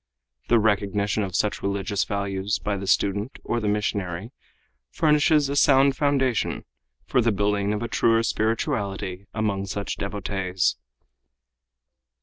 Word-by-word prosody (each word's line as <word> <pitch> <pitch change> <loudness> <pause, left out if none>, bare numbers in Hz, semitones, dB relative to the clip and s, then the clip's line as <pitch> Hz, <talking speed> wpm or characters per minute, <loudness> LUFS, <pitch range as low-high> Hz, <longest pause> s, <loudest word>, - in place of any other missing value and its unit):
The 120 - +4
recognition 105 -1 +1
of 95 -3 -3
such 105 +1 0
religious 100 0 -1
values 100 +1 -2
by 105 - -2
the 100 0 -5
student 100 +5 0
or 120 - -1
the 110 - -2
missionary 100 -1 -2 0.6
furnishes 150 - +3
a 140 - -3
sound 135 -1 +5
foundation 135 -5 0 0.4
for 125 - +2
the 115 0 +2
building 100 0 0
of 105 +2 -2
a - - -2
truer 115 0 +2
spirituality 105 -5 -2
among 100 -3 -1
such 100 +1 -4
devotees. 95 -8 -1
105 Hz, 130 wpm, -24 LUFS, 100-115 Hz, 0.6 s, sound